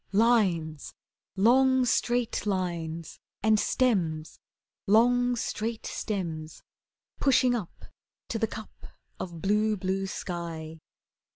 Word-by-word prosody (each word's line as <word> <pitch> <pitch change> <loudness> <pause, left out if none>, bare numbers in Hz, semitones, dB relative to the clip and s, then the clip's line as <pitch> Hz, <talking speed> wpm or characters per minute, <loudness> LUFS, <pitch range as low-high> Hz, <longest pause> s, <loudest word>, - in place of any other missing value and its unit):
Lines 190 -9 +2 0.4
long, 260 +5 +4
straight 240 -2 0
lines! 170 -4 -3 0.2
And 215 -1 +4
stems, 170 -13 0 0.5
Long, 245 +4 +4
straight 225 -1 -3
stems 165 -7 -4 0.6
Pushing 255 -2 +4
up 215 -8 -5 0.4
To 225 - -2
the 225 - +1
cup 220 0 -10 0.3
of 170 -3 -6
blue, 210 +2 +2
blue 190 +1 -1
sky. 165 -4 -5
205 Hz, 95 wpm, -28 LUFS, 170-235 Hz, 0.6 s, long